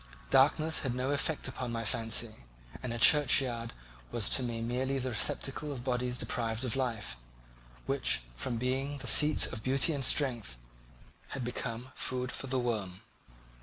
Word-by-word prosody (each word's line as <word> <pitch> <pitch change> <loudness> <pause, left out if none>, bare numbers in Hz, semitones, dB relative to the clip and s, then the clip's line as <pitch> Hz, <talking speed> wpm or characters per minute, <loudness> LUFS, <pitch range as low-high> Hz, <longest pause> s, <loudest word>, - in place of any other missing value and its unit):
Darkness 150 +4 +4
had 130 -3 -2
no 130 +2 -1
effect 145 +1 0
upon 130 -2 -5
my 115 -1 -3
fancy, 115 0 0 0.4
and 125 - -4
a 120 - -3
churchyard 125 -3 +4 0.4
was 115 -4 +1
to - - +4
me 120 -2 -3
merely 125 +4 -2
the 130 -1 -3
receptacle 135 +6 0
of 130 -4 -6
bodies 125 -1 -1
deprived 115 0 -2
of 125 - -1
life, 120 - -3 0.7
which, - - +1
from 120 - -3
being 135 +4 -2
the 135 - -8
seat 150 +4 +5
of 115 - -6
beauty 135 +6 +3
and 140 -2 -2
strength, 120 - 0 0.8
had 130 - -4
become 120 0 -5
food 125 0 -2
for 135 - -5
the 130 0 +1
worm. 105 -7 -3
125 Hz, 160 wpm, -31 LUFS, 115-135 Hz, 0.8 s, seat